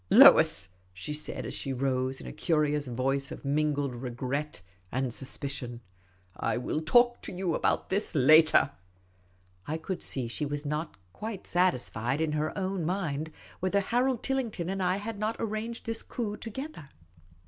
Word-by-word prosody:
" - - -36
Lois," 95 0 +8 0.2
she 95 +11 -4
said, 150 +1 -2
as - - -5
she 135 - -2
rose, 130 0 0
in - - -10
a - - -6
curious 150 -3 +1
voice 135 +3 -1
of - - -8
mingled 145 -2 +1
regret 130 +1 -4 0.3
and 130 -1 -1
suspicion, 130 -2 -4 0.3
" - - -33 0.2
I - - -1
will 125 +5 -1
talk 240 +9 +4
to - - -4
you 180 -2 -1
about - - +1
this 195 -2 0
later." 155 +1 +6 1.0
I 155 - -1
could 175 +3 -4
see 130 -3 -1
she 115 +6 -4
was 145 +1 -3
not 150 -4 -3 0.2
quite 215 -3 -6
satisfied 135 - +1
in 160 -1 +1
her 155 +1 0
own 190 -2 -1
mind 160 -3 -2 0.3
whether 185 +2 +2
Harold 245 +4 +1
Tillington 230 -10 -1
and 195 0 -2
I 185 +1 +2
had 210 +1 -5
not 215 +2 0
arranged 225 +2 -3
this 225 0 -2
coup 215 -4 -4
together. 230 - -7
155 Hz, 165 wpm, -29 LUFS, 135-195 Hz, 1.0 s, Lois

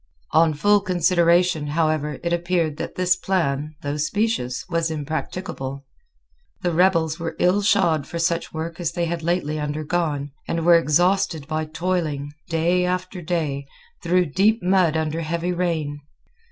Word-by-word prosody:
On 160 -1 +4
full 205 +7 +4
consideration, 175 -3 +2
however, 155 -2 0
it 170 0 0
appeared 170 -3 0
that - - -5
this 180 0 +2
plan, 155 -6 -1
though 145 +1 -2
specious, 155 - -1
was 165 -2 0
impracticable. 150 -2 -4 0.8
The 175 - +1
rebels 165 -2 +2
were 165 0 -4
ill 185 +3 +3
shod 175 -8 +2
for 170 - -5
such 170 0 0
work 160 +1 -5
as 170 -4 -2
they 175 - -1
had 170 0 -3
lately 160 -2 -1
undergone, 150 -1 -2 0.2
and 165 -1 -1
were 175 - +7
exhausted 170 0 +2
by 155 0 -2
toiling, 155 -3 -2 0.2
day 170 +2 +2
after 180 0 -2
day, 155 -5 -2 0.3
through 180 +1 +2
deep 215 +3 +3
mud 180 -4 +3
under 160 +1 -1
heavy 170 +2 -2
rain. 160 -5 -2
165 Hz, 145 wpm, -23 LUFS, 155-180 Hz, 0.8 s, were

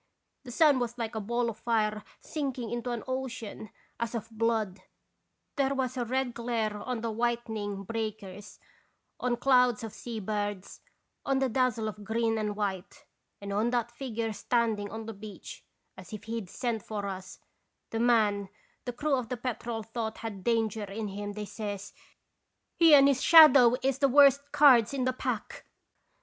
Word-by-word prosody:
The 245 - -8
sun 290 0 +4
was 240 0 -3
like 230 -1 -3
a 220 - -3
ball 235 +3 -1
of 230 - -5
fire 215 -2 0 0.2
sinking 265 -7 -4
into 240 +1 -3
an 240 -2 -3
ocean 250 -5 -5 0.3
as 235 0 -3
of 225 0 -5
blood; 220 -3 -1 0.8
there 275 0 +1
was 260 -1 -2
a 245 -2 -2
red 255 +1 -1
glare 230 -3 -2
on 235 +2 -4
the 230 -1 -2
whitening 220 -3 -2
breakers, 210 -2 -6 0.6
on 245 -1 0
clouds 250 -4 +3
of 225 - -6
sea 235 -2 -6
birds, 205 -1 -4 0.4
on 270 - +1
the 265 -1 +1
dazzle 235 -2 0
of 210 -1 -7
green 225 +1 0
and 210 -1 -2
white, 195 -3 -4 0.3
and 200 0 -6
on 215 +4 +1
that 240 -1 -1
figure 230 -3 -4
standing 220 -2 0
on 220 +1 -7
the 225 - -6
beach, 210 0 -10 0.3
as - - -12
if 210 -1 -7
he 225 +1 -4
'd 185 - -12
sent 235 -1 -2
for 205 -1 -5
us, 190 -1 -6 0.5
the 225 - -2
man 215 -4 +2 0.4
the 245 - -3
crew 295 +4 -1
of 250 -4 -3
the 250 - -3
Petrel 235 -2 -4
thought 225 0 -4
had 200 -4 -6
danger 225 -2 0
in 205 +2 -5
him, 205 +1 -5
they 210 0 -5
says: 205 -1 -6 0.3
" - - -51
' - - -52
He 330 -3 +8
and 275 -1 +7
his 275 -2 +2
shadow 285 -7 +8
is 270 0 0
the 275 - +3
worst 280 +1 +5
cards 280 -5 +6
in 260 - -1
the 255 0 +1
pack - - -4
230 Hz, 180 wpm, -29 LUFS, 210-250 Hz, 0.8 s, He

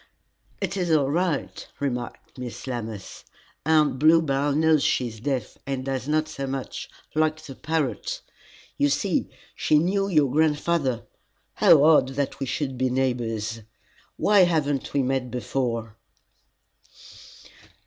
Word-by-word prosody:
"It - - -2
is 180 -2 -1
all 145 -4 +3
right," 170 -2 -1
remarked 125 -4 -4
Miss 125 -2 -7
Lammas. 115 -6 -6 0.4
"Aunt 150 -5 +3
Bluebell 145 -2 +3
knows 155 -1 +3
she 125 - +1
is 110 -1 -11
deaf, 130 -1 -3
and 135 -1 -3
does 135 -1 -3
not 155 +1 +1
say 140 -3 -5
much, 135 -1 -5 0.2
like 155 0 +1
the 140 - -8
parrot. 150 -5 -2 0.6
You 145 - +4
see, 185 +5 0 0.2
she 155 - +2
knew 195 +5 +1
your 150 -8 +3
grandfather. 150 -4 +1 0.5
How 145 -3 +6
odd 150 -4 +5
that 140 -1 -2
we 135 - -3
should 135 -2 -3
be 130 0 +2
neighbors! 115 -4 -1 0.6
Why 210 -1 +4
have 170 -5 +4
we 145 - 0
never 135 0 -1
met 130 -1 -1
before?" 115 -2 -3
140 Hz, 135 wpm, -25 LUFS, 125-155 Hz, 0.6 s, How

